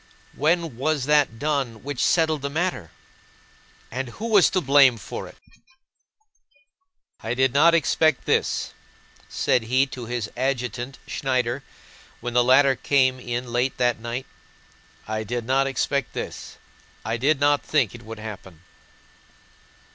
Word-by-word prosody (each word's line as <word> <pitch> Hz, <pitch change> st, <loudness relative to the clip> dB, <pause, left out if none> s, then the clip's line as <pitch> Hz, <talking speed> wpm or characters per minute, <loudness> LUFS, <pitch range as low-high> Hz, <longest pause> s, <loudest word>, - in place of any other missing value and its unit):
When 160 Hz, -3 st, 0 dB
was 145 Hz, 0 st, 0 dB
that 145 Hz, -5 st, +2 dB
done 135 Hz, -5 st, -2 dB
which 140 Hz, -2 st, -3 dB
settled 160 Hz, -3 st, +2 dB
the 140 Hz, -, -3 dB
matter? 160 Hz, -, -2 dB, 1.0 s
And 130 Hz, +2 st, -3 dB
who 225 Hz, -, -6 dB
was 205 Hz, -4 st, +5 dB
to 185 Hz, -, +1 dB
blame 135 Hz, -5 st, +5 dB
for 105 Hz, -, -7 dB
it?" -, -, -15 dB, 1.8 s
"I 115 Hz, +2 st, -3 dB
did 130 Hz, -1 st, +2 dB
not 165 Hz, +4 st, +5 dB
expect 155 Hz, -2 st, +2 dB
this," -, -, 0 dB, 0.6 s
said 125 Hz, -, +1 dB
he 130 Hz, +4 st, +3 dB
to 125 Hz, -3 st, -8 dB
his 120 Hz, -3 st, -3 dB
adjutant 125 Hz, -1 st, -3 dB
Schneider 130 Hz, -1 st, -1 dB, 0.6 s
when 120 Hz, 0 st, -5 dB
the 125 Hz, 0 st, +4 dB
latter 135 Hz, +2 st, +5 dB
came 130 Hz, -1 st, +2 dB
in 120 Hz, 0 st, -4 dB
late 125 Hz, +2 st, 0 dB
that 120 Hz, -2 st, +1 dB
night. 120 Hz, +3 st, -5 dB, 0.8 s
"I 110 Hz, 0 st, -2 dB
did 120 Hz, +2 st, -4 dB
not 135 Hz, +2 st, +2 dB
expect 135 Hz, 0 st, -1 dB
this! -, -, -7 dB, 0.5 s
I 115 Hz, -, -1 dB
did 140 Hz, +4 st, +2 dB
not 145 Hz, 0 st, +3 dB
think 140 Hz, -9 st, +1 dB
this 120 Hz, -, -11 dB
would 115 Hz, -1 st, -9 dB
happen." 100 Hz, -6 st, -9 dB
130 Hz, 140 wpm, -24 LUFS, 120-145 Hz, 1.8 s, was